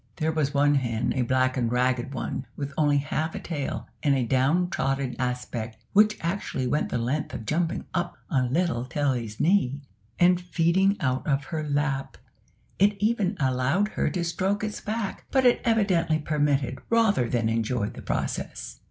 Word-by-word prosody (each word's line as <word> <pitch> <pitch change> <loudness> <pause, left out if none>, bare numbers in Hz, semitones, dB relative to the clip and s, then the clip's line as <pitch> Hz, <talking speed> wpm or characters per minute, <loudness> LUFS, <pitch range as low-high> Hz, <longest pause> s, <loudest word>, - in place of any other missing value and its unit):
There 155 +1 0
was 155 -3 0
one 145 0 +3
hen 120 -5 0
a 130 - +1
black 130 +1 +2
and 120 -2 0
ragged 125 +1 +1
one, 130 -1 -4
with 140 -1 -5
only 145 -2 +3
half 155 +3 -2
a - - -3
tail, 150 -5 -4
and 140 -3 +3
a 130 -2 +1
downtrodden 135 0 +1
aspect 125 -3 -3 0.2
which 210 +1 +5
actually 170 -6 -2
went 135 +5 0
the - - -1
length 130 +6 -2
of 110 - -6
jumping 165 +4 -1
up 175 -1 -2
on 130 -4 0
little 165 -5 +1
Tilly's 125 -5 -2
knee, 155 -6 +2 0.4
and 180 0 +4
feeding 180 +3 +2
out 130 -1 -1
of 140 -2 +1
her 155 +3 -4
lap. 145 -1 -1 0.6
It 205 +2 +4
even 210 -3 +1
allowed 135 +9 +1
her - - 0
to 180 - -2
stroke 190 +4 -1
its 215 -1 -4
back, 215 -1 -4
but 265 -1 +2
it 245 - +5
evidently 190 -8 +2
permitted 145 -4 0
rather 220 - +3
than 115 -2 +1
enjoyed 115 -1 -1
the - - -9
process. - - -4
145 Hz, 170 wpm, -26 LUFS, 130-180 Hz, 0.6 s, which